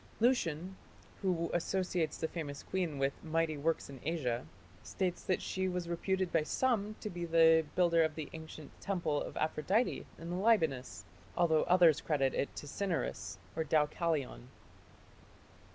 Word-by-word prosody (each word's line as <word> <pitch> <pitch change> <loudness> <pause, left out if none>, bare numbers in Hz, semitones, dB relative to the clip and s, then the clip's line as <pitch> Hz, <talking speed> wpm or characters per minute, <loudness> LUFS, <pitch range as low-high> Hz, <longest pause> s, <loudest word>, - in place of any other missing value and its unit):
" - - -26
Lucian, 190 - +1 0.4
who 175 -4 0
associates 180 -1 0
the 160 - -1
famous 145 -4 -6
queen 175 -6 -2
with 135 0 +1
"mighty 160 0 0
works 160 +3 -1
in 135 -2 -10
Asia", 130 -7 -1 0.3
states 185 -2 -2
that 185 - -1
she 190 0 -1
was 180 -1 -3
reputed 185 +1 -1
by - - +4
some 215 +4 0
to - - -5
be 175 -4 -5
the 165 -1 +5
builder 170 -2 +4
of 160 -1 +1
the 155 -2 -4
ancient 160 -1 -9
temple 170 -7 -1
of - - -6
Aphrodite 180 - 0
in 170 +1 -7
the 175 - -2
Libanus, 155 - +1 0.3
although 160 -3 +3
others 175 -4 +5
credited 135 -4 +1
it 140 - -2
to - - -6
Cinyras, 170 -1 -3 0.2
or 160 - 0
Deukalion. 150 - 0
165 Hz, 150 wpm, -33 LUFS, 150-185 Hz, 0.4 s, the